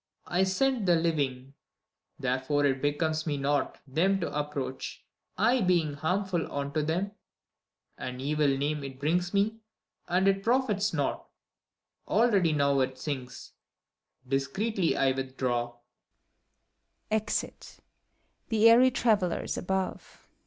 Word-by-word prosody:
I 180 +2 +1
scent 230 +3 +1
the 175 - +5
Living! 140 -6 -1 0.6
therefore 130 +3 0
it 135 -1 +1
becomes 155 +2 0
me 145 -2 0
not 140 +1 0
Them 175 +8 +1
to 165 - -3
approach, 145 -3 -4 0.3
I 235 +6 +3
being 175 -6 +2
harmful 180 +4 -1
unto 140 +2 -2
them: 170 +6 -1 0.9
An 125 0 -5
evil 150 +2 +1
name 140 +2 0
it 135 -1 -8
brings 175 +5 0
me, 210 +2 +1 0.5
and 185 +2 +2
it 195 0 +3
profits 220 -3 +1
naught. 145 -4 -2 0.8
Already 205 -7 +3
now 140 -2 +2
it 130 0 -1
sinks: 130 -2 -6 0.8
discreetly 165 - 0
I 135 - +3
withdraw. 130 -2 -2
150 Hz, 100 wpm, -29 LUFS, 135-190 Hz, 0.9 s, the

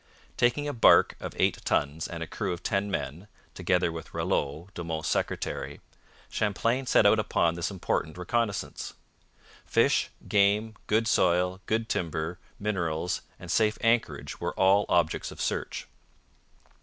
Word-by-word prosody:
Taking 125 +4 +2
a 145 - -2
barque 115 - +6
of - - -6
eight - - +1
tons 75 +3 0
and 85 -1 -5
a - - -7
crew 95 +1 -2
of 85 - -8
ten 100 -1 0
men 95 -1 -4 0.3
(together 90 -1 +1
with 80 0 -8
Ralleau, 75 +6 -1
De 85 - -5
Monts' 80 -1 -3
secretary), - - -2 0.5
Champlain 115 +5 0
set - - +5
out - - +6
upon 85 -1 +2
this 85 0 -2
important 90 -4 -2
reconnaissance. 105 +3 -2 0.7
Fish, - - +2 0.2
game, 105 +2 +3
good 110 +1 +2
soil, 90 +1 +2
good 110 +1 0
timber, 85 -1 -2 0.2
minerals, 90 -4 -1 0.2
and 90 -2 -6
safe 110 +1 +2
anchorage 115 0 0
were 85 0 -2
all 95 +2 +4
objects 85 -3 +1
of - - -11
search. - - -2
95 Hz, 145 wpm, -28 LUFS, 85-105 Hz, 0.7 s, barque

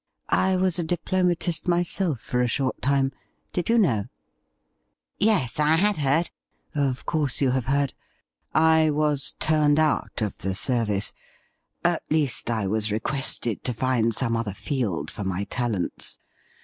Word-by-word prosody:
I 190 0 +3
was 185 -1 +1
a - - 0
diplomatist 175 0 0
myself 175 - +1
for 125 +2 -1
a 125 - +2
short 130 +2 -1
time. 135 0 +2 0.4
Did 180 +2 -2
you 230 - +4
know 115 - +2 0.4
.?' - - -49
' - - -48 0.3
Yes, 195 - +2
I 150 +1 +4
had 205 +4 +2
heard.' 150 +3 +1 0.4
'Of 140 -4 -1
course 150 -5 0
you 135 -3 +3
have 130 -2 -1
heard. 140 0 +1 0.6
I 160 0 +4
was 150 -2 0
turned 150 -2 +3
out 155 -6 +1
of 105 - -4
the 95 -1 -2
service 110 -3 +1 0.4
— - - -33
at 175 -1 +2
least, 150 -6 +1
I 110 -3 0
was 105 +2 0
requested 115 0 -1
to 125 - -1
find 120 -1 +1
some 115 +1 -1
other 110 -4 -3
field 100 - -2
for 105 - -6
my 95 0 -2
talents. 110 -5 -3
140 Hz, 160 wpm, -25 LUFS, 115-160 Hz, 0.6 s, you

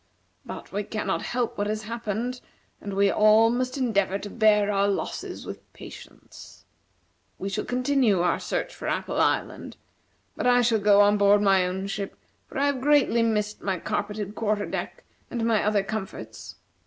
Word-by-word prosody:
But - - -9
we 205 - -2
cannot 215 +1 -2
help 240 -3 -2
what 205 - 0
has 215 0 -3
happened, 230 +2 -4 0.4
and 200 -1 -5
we 200 0 +3
all 215 +2 +5
must 255 +2 -2
endeavor 200 -7 +1
to 205 0 -8
bear 210 -2 +3
our 200 0 +2
losses 200 - -4
with - - -10
patience. - - -13 0.7
We 195 - -4
shall 205 +2 -3
continue 250 -5 +2
our 175 - +1
search - - -3
for - - -7
Apple - - -1
Island, - - -1 0.6
but - - -1
I 245 0 +5
shall 230 -2 +2
go 205 0 +5
on 205 0 +4
board 205 +1 +5
my 190 -2 +4
own 190 +2 -4
ship, 200 0 -5 0.3
for - - -9
I 280 - +2
have 280 -3 0
greatly 285 -4 +3
missed 210 -2 -1
my 190 -2 -1
carpeted 205 +2 -3
quarter 215 -2 -1
deck - - -5 0.3
and 235 -2 -2
my 225 -2 +2
other 210 -1 +2
comforts. 190 - -7
210 Hz, 170 wpm, -25 LUFS, 200-235 Hz, 0.7 s, all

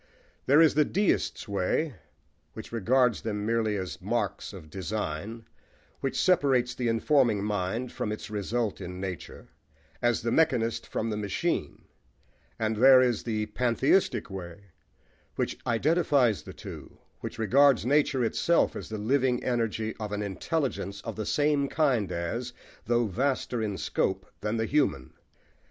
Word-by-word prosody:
There 145 +4 +6
is 160 - +6
the 150 - +4
deist's 195 - 0
way, 100 - 0 0.6
which 110 - -9
regards 120 +1 +2
them 105 -2 -3
merely 110 -2 +1
as 95 -6 -5
marks - - -2
of 75 - -11
design, 105 +3 -4 0.5
which 135 - -2
separates 135 -9 +3
the 120 -1 -2
informing 115 -2 +2
mind 105 +4 -2
from 105 - -3
its 105 - -5
result 105 +2 -2
in 90 +1 -6
nature, 95 -4 -7 0.5
as 120 -2 +1
the 115 - 0
mechanist 125 -8 +1
from 115 0 -2
the 105 - -2
machine; 100 -2 -2 0.7
and 110 -1 -1
there 130 +3 +8
is 125 -4 +2
the 110 -2 -2
pantheistic 125 - +1
way, 95 +1 -9 0.6
which - - -2
identifies 135 - +2
the - - -10
two, - - -10 0.2
which - - -6
regards 130 +3 +4
nature 140 -1 +2
itself 170 +9 +2
as - - -7
the 110 - -4
living 125 +3 +1
energy 115 -3 -1
of 105 -2 -4
an 105 0 -2
intelligence 100 - -2
of 115 - -6
the 110 -1 -4
same 145 -1 +2
kind 135 - +1
as 115 +9 -3 0.3
though 120 0 +2
vaster 125 +2 -1
in 105 -3 -2
scope - - -1
than 105 +2 -2
the 110 - 0
human. 135 - 0
115 Hz, 145 wpm, -28 LUFS, 105-130 Hz, 0.7 s, there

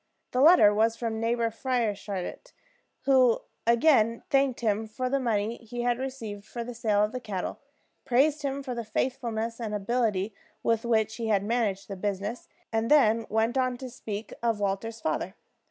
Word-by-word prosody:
The 250 - +1
letter 280 -10 +7
was 225 +2 +2
from 225 -1 -2
Neighbor 230 0 0
Frieshardt, 220 - -3 0.5
who 260 -4 +4 0.3
again 235 -2 +4
thanked 275 -3 +2
him 220 -1 0
for 255 +4 -3
the 275 - +2
money 225 -2 0
he 240 +1 -6
had 245 0 +1
received 230 -6 -5
for 235 +3 -6
the 245 +1 -6
sale 215 -3 +2
of 210 - 0
the 255 - -4
cattle, 205 -6 -4 0.4
praised 280 +4 +2
him 280 0 -2
for 260 -2 -4
the 235 -1 -4
faithfulness 230 0 -2
and 215 -3 -3
ability 210 -1 0 0.3
with 230 0 +1
which 220 -2 +1
he 230 -2 -3
had 200 -3 +2
managed 210 -3 -1
the 195 - -5
business, 205 +4 -3 0.3
and 225 +1 0
then 230 -6 +4
went 225 +4 +1
on 255 -1 0
to 255 0 -7
speak 215 -1 -6
of 230 -2 +1
Walter's 205 +3 -2
father. 175 +5 -2
230 Hz, 170 wpm, -28 LUFS, 210-250 Hz, 0.5 s, letter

